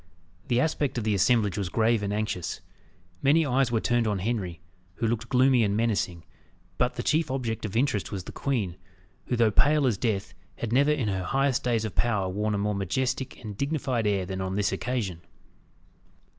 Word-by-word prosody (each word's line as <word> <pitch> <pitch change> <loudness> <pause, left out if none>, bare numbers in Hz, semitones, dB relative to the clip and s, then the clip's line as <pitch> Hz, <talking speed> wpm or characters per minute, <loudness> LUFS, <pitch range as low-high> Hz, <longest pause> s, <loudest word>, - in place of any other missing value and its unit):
The 120 -1 +2
aspect 145 -2 0
of 120 - -1
the 110 -1 +1
assemblage 105 0 +2
was 95 -3 -2
grave 115 +1 +2
and 100 0 -2
anxious. 105 -5 -2 0.6
Many 155 +4 +4
eyes 130 -2 +2
were 115 - +2
turned 120 0 +1
on 105 -2 0
Henry, 95 -5 -2 0.4
who 115 - -2
looked 115 +1 -1
gloomy 130 -1 +4
and 100 -1 +1
menacing, 100 -7 0 0.6
but 125 0 +1
the - - -3
chief 155 0 +1
object 120 -4 -2
of 105 +1 -3
interest 120 -6 0
was 95 -3 -4
the - - -8
queen, 105 -11 -2 0.5
who, 125 - 0
though 115 -2 +3
pale 145 +6 +4
as 115 -7 +1
death, 105 -5 -1 0.2
had 115 -1 -4
never 140 +3 +4
in 145 -7 +1
her 95 -2 -1
highest 135 +2 +1
days 115 -3 +1
of 110 - -4
power 105 -5 +1
worn 105 +3 -1
a - - 0
more 105 +1 0
majestic 125 +7 -2
and 105 -2 -6
dignified 135 -6 0
air 100 -3 +1
than 95 +1 -4
on 95 0 -2
this 105 0 +1
occasion. 100 -4 -2
115 Hz, 195 wpm, -27 LUFS, 100-130 Hz, 0.6 s, Many